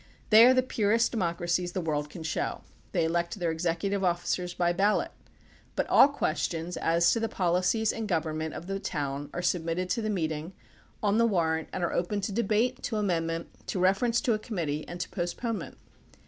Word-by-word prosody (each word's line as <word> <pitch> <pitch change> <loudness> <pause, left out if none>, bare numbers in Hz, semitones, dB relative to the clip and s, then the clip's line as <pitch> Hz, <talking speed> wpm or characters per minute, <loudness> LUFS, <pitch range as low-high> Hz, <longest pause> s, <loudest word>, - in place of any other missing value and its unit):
They 225 +3 +9
are 255 - +7
the 255 - +4
purest 230 -1 +1
democracies 175 -3 -1
the - - -1
world 150 -3 -2
can 160 +2 -8
show. 155 -2 -2 0.3
They 165 - +1
elect 170 +3 -1
their 175 -3 0
executive 175 +4 -1
officers 175 0 -1
by 175 0 +2
ballot. 200 +4 +1 0.6
But - - 0
all - - +8
questions 170 - -2
as 170 +1 +3
to 230 - +1
the 225 0 -1
policies 185 +5 +1
and 225 -1 -4
government 160 -3 -2
of - - -7
the 195 +1 -3
town 145 -4 -3
are 175 - -4
submitted 175 +1 -1
to 235 - 0
the 215 - -2
meeting 160 -3 -2 0.5
on 205 +1 +3
the 230 - +5
warrant 160 -6 0
and 185 - -3
are 170 - 0
open 190 +4 -1
to 200 - -3
debate, 235 +4 +1
to 225 - -3
amendment, 165 -5 -1 0.2
to - - -2
reference 195 +6 +2
to 250 -6 +2
a 215 - -1
committee 165 -9 -3
and 175 - -7
to - - -4
postponement. 205 +5 -4
180 Hz, 190 wpm, -28 LUFS, 165-210 Hz, 0.6 s, They